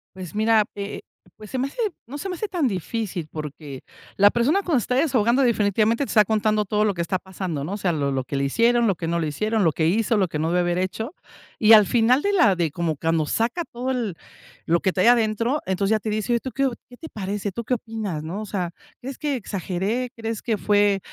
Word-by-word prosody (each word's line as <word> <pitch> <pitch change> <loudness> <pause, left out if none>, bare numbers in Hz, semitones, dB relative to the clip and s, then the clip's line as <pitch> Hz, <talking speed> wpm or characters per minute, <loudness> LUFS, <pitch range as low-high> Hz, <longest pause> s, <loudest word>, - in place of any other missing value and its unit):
Pues, 185 0 -8
mira, 220 0 +3
eh, 200 0 -5 0.4
pues, 215 -1 -11
se 260 - -2
me 260 +2 0
hace - - -14 0.3
no 275 +5 -7
se 390 - -5
me 365 - -3
hace 430 - -3
tan 335 -8 +1
difícil, 190 -3 -3
porque 150 -3 -7 0.3
la 205 +1 +7
persona 270 +11 +2
cuando 315 -9 +2
se - - -3
está 250 - -1
desahogando 260 -3 +3
definitivamente 220 +2 +2
te - - -5
está 215 -2 +5
contando 215 0 +1
todo 210 +2 +1
lo 205 -2 +2
que 170 - -3
está 175 +2 -1
pasando, 185 -6 -5
¿no?, 170 +7 -4
o 205 - -3
sea, 180 -4 0
lo 140 -2 -1
lo 130 -1 -1
que 140 - -5
le 140 - 0
hicieron, 235 - +3
lo 195 - +2
que 165 0 -5
no 170 +1 0
le 155 - -1
hicieron, 215 +8 0
lo 165 - +4
que 160 +1 0
hizo, 220 +4 +2
lo 190 -3 +2
que 155 - -4
no 160 +2 0
debió 180 0 +2
haber 175 0 0
hecho, 220 - -3 0.4
y 220 0 +4
al 215 -2 +9
final 240 +6 +3
de 405 0 0
la 335 - +4
de 165 -4 0
como 165 -3 -2
cuando 160 +1 +1
saca 245 +10 0
todo 250 +2 -3
el 230 -9 -2 0.5
lo 170 +1 +2
que 190 - +1
trae 185 +3 +2
adentro, 230 +4 +2
entonces, 195 +2 0
ya 220 - +3
te 215 - -4
dice: 215 +3 -1
"Oye, - - +4
¿y - - -3
tú 260 - -5
qué 275 +1 0
o 260 - +1 0.2
qué 245 - -14
te 320 - -9
parece, 205 0 -4
tú 235 - -4
qué 250 - 0
opinas, 220 -9 -5
no?, 175 +7 -5
o - - -5
sea, 185 -4 -3 0.3
¿crees 265 +1 -7
que 295 -2 -1
exageré? 200 +4 -3
¿Crees 225 -1 -4
que 225 -3 -1
fue 205 -1 +2
210 Hz, 255 wpm, -23 LUFS, 180-235 Hz, 0.5 s, al